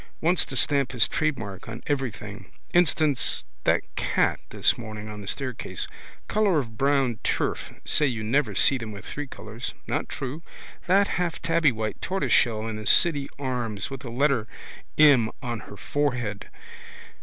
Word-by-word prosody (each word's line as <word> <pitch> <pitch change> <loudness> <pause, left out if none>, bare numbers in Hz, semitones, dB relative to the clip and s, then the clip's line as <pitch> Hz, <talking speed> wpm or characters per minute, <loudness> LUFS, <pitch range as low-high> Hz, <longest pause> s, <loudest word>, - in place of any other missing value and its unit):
Wants 175 +3 +3
to 135 - -6
stamp 140 -1 +2
his 120 -3 +3
trademark 115 - -2
on 115 - -7
everything. 115 -7 -4 0.2
Instance, 155 - +3 0.2
that - - +3
cat - - +1
this 130 - +2
morning 110 -3 -7
on 105 -1 -7
the 100 - -10
staircase. 130 -1 -3 0.4
Colour 205 -5 +2
of 115 -6 -2
brown 135 -3 +1
turf. - - -1
Say 150 - +4
you 115 -4 -2
never 115 -2 +1
see 130 +6 +5
them 115 -2 -6
with 100 -1 -9
three 145 -1 -5
colours. 110 -1 -7
Not - - -2
true. 135 +5 -5 0.5
That 195 +2 +4
half 175 -2 -2
tabbywhite 145 -10 +1
tortoiseshell 120 - +2
in 110 -1 -4
the 110 - -6
City 145 -5 +4
Arms 125 -6 -3
with 135 - -5
the 130 - -7
letter 125 -2 +1 0.5
em 140 -7 +6
on 120 -2 -3
her 100 - -10
forehead. 125 -8 -2
130 Hz, 155 wpm, -26 LUFS, 110-145 Hz, 0.5 s, em